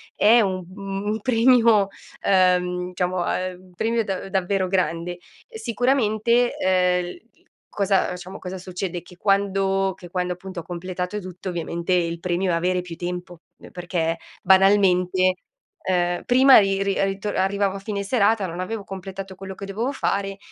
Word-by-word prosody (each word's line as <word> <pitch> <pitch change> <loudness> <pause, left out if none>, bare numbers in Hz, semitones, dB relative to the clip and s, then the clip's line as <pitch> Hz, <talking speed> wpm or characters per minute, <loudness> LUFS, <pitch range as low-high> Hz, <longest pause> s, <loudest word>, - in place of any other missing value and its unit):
è 230 +3 +6
un 185 -3 -1
un 195 0 -5
un 215 +1 -1
premio, 230 -4 +4 0.3
ehm, 180 -1 +2
diciamo, 180 0 -1
uhm, 185 0 -2
un 185 -1 -20
premio 230 +4 0
da 195 -1 -4
davvero 190 0 0
grande. 175 -1 -1 0.3
Sicuramente, 240 - +1
ehm, 180 - +1 0.5
cosa, 195 -2 +1
diciamo, 185 +2 -9
cosa 185 0 -6
succede? 180 -1 -5
Che 180 0 -16
quando 195 -1 +1
che 175 - -12
quando, 180 0 -1
appunto, 185 0 -8
ho - - -16
completato 180 +3 -4
tutto, 185 0 -7
ovviamente, 170 +1 -2
il 170 -1 0
premio 180 +1 0
è - - +1
avere 180 +2 0
più 175 -2 -8
tempo. 175 0 -6 0.3
Perché, 170 -2 -2 0.2
banalmente, 185 -1 +4 0.5
uhm, 175 -1 +1
prima 260 +2 +7
ri 195 -1 +3
ri 195 0 +1
rito 195 +1 -2
arrivavo 195 0 0
a 195 - -5
fine 200 0 -4
serata, 205 -2 +2
non 175 +1 -6
avevo 210 +3 -4
completato 195 0 -7
quello 190 0 -8
che 195 - -7
dovevo 220 +7 -2
fare 195 -7 -2
190 Hz, 150 wpm, -23 LUFS, 180-200 Hz, 0.5 s, prima